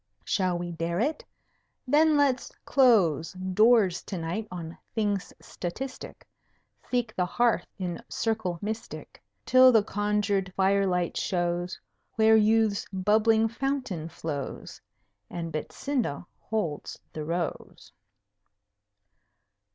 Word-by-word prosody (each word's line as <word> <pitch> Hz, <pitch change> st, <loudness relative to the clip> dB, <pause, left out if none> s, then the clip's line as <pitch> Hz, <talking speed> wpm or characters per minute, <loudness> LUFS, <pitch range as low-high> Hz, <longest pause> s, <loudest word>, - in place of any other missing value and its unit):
Shall 185 Hz, -3 st, +1 dB
we 175 Hz, 0 st, -4 dB
dare 170 Hz, +1 st, -2 dB
it? 295 Hz, +7 st, -1 dB, 0.6 s
Then 305 Hz, +3 st, +4 dB
let's 275 Hz, -3 st, +1 dB
close 200 Hz, -, +3 dB
Doors 190 Hz, +1 st, +3 dB
to 190 Hz, -, -5 dB
night 175 Hz, +6 st, -3 dB
on 170 Hz, -2 st, -7 dB, 0.2 s
things 205 Hz, -3 st, -1 dB
statistic, 255 Hz, +10 st, -7 dB, 0.6 s
Seek 240 Hz, -3 st, -1 dB
the 180 Hz, -1 st, 0 dB
hearth 240 Hz, +4 st, +1 dB
in 180 Hz, -3 st, -4 dB
circle 220 Hz, -6 st, -1 dB
mystic, 220 Hz, +2 st, -6 dB, 0.2 s
Till 255 Hz, 0 st, +7 dB
the 220 Hz, -4 st, +5 dB
conjured 205 Hz, -2 st, 0 dB
fire 195 Hz, +1 st, +3 dB
light 180 Hz, -2 st, -1 dB
shows 175 Hz, -1 st, -1 dB, 0.4 s
Where 220 Hz, 0 st, +5 dB
Youth's 220 Hz, -1 st, +3 dB
bubbling 215 Hz, +3 st, +3 dB
Fountain 230 Hz, -, -3 dB
flows, 145 Hz, -5 st, -6 dB, 0.5 s
And 165 Hz, -2 st, -5 dB
Betsinda 200 Hz, -, -3 dB
holds 190 Hz, -10 st, -3 dB, 0.2 s
the 155 Hz, -, -4 dB
Rose. 170 Hz, +1 st, -4 dB
200 Hz, 105 wpm, -27 LUFS, 175-225 Hz, 0.6 s, Till